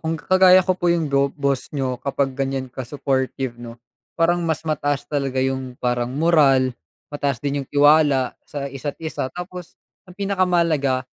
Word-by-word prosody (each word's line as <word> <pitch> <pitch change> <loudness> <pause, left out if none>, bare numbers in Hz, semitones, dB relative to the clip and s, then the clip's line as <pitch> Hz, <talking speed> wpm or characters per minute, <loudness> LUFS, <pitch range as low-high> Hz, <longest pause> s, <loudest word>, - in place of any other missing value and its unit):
kung 160 0 -3
kagaya 185 0 +6
ko 185 0 0
po 175 -1 +2
yung 165 -3 0
go 140 0 +1
boss 140 -1 -2
niyo, 130 -3 -2
kapag 140 -1 -1
ganyan 135 -1 -2
ka-supportive 130 -1 -3
'no, 120 0 -10 0.3
parang 175 +1 +1
mas 160 -2 -1
mataas 145 -2 -1
talaga 135 -3 -1
yung 130 -1 -2
parang 125 0 -1
moral, 140 -5 +3 0.3
mataas 140 -4 -2
din 140 -1 -2
yung - - -14
tiwala 145 -3 +4
sa 140 -1 -5
isa't 135 +1 -6
isa 155 -5 -4
tapos 180 -1 -8 0.3
ang 180 - -14
pinakamahalaga, 170 -9 +1
140 Hz, 155 wpm, -21 LUFS, 130-165 Hz, 0.3 s, kagaya